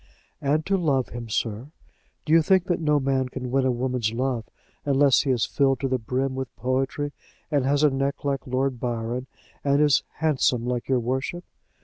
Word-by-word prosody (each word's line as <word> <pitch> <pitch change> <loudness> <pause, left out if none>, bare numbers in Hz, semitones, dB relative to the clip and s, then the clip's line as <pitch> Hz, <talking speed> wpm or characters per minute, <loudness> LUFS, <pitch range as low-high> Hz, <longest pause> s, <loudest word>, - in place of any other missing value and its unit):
"And 150 +3 +1
to 195 0 +2
love 135 - +1
him, 115 -1 -7
sir. 110 +3 -2 0.6
Do 155 - +1
you 165 - +7
think 190 +2 +3
that 175 - 0
no 150 -2 +2
man 130 -1 0
can 125 -1 -5
win 135 0 +2
a - - +3
woman's 125 -2 -1
love, 120 -1 -1 0.4
unless 140 -2 +4
he 140 - -3
is 125 -4 +2
filled 135 -2 +1
to 135 - +1
the 130 -1 0
brim 130 +4 -1
with 130 -1 -5
poetry, 135 +4 -1 0.4
and 140 -3 +2
has 145 +2 +2
a 150 - +5
neck 135 +2 -2
like 140 -2 -1
Lord 130 0 -1
Byron, 120 +1 -3 0.4
and 140 0 +3
is 150 -3 +4
handsome 130 -6 +1
like 125 -1 -2
your 130 -2 +3
worship? 130 +8 -2
130 Hz, 195 wpm, -25 LUFS, 125-145 Hz, 0.6 s, you